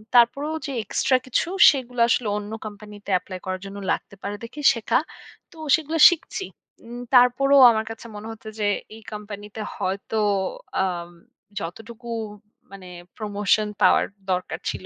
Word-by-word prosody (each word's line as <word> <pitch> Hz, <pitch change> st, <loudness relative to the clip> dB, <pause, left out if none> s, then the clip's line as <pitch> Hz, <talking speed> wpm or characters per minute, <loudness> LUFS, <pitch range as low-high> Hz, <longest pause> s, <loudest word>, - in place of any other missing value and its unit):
তারপরেও 280 Hz, +6 st, +4 dB
যে 285 Hz, -, -4 dB
এক্সট্রা 260 Hz, +6 st, +2 dB
কিছু 255 Hz, +5 st, 0 dB, 0.2 s
সেগুলো 250 Hz, -4 st, -3 dB
আসলে 235 Hz, -1 st, +1 dB
অন্য 210 Hz, 0 st, -6 dB
কোম্পানিতে 210 Hz, -1 st, -10 dB
এপ্লাই 185 Hz, 0 st, -9 dB
করার 185 Hz, 0 st, -3 dB
জন্য 195 Hz, +1 st, -8 dB
লাগতে -, -, -3 dB
পারে 205 Hz, +1 st, -4 dB
দেখি 270 Hz, +6 st, -8 dB
শেখা। 230 Hz, +1 st, +1 dB, 0.5 s
তো 335 Hz, -, -17 dB, 0.2 s
সেগুলো 320 Hz, +1 st, -3 dB
শিখছি। 355 Hz, +3 st, -4 dB, 0.4 s
উম 240 Hz, +1 st, -8 dB
তারপরেও 265 Hz, +2 st, +6 dB
আমার 220 Hz, -1 st, -1 dB
কাছে 225 Hz, +1 st, -10 dB
মনে 210 Hz, +1 st, -8 dB
হচ্ছে 220 Hz, -1 st, -10 dB
যে 210 Hz, -, 0 dB, 0.3 s
এই 225 Hz, -, -13 dB
কোম্পানিতে 210 Hz, 0 st, -8 dB
হয়তো 195 Hz, +3 st, -3 dB, 0.6 s
আ -, -, +3 dB, 0.8 s
যতটুকু 225 Hz, +7 st, -8 dB, 0.7 s
মানে 190 Hz, -2 st, -11 dB, 0.3 s
প্রমোশন 210 Hz, 0 st, +1 dB
পাওয়ার -, -, +5 dB, 0.3 s
দরকার 180 Hz, 0 st, -2 dB
ছিল -, -, -5 dB
220 Hz, 140 wpm, -23 LUFS, 205-250 Hz, 0.8 s, তারপরেও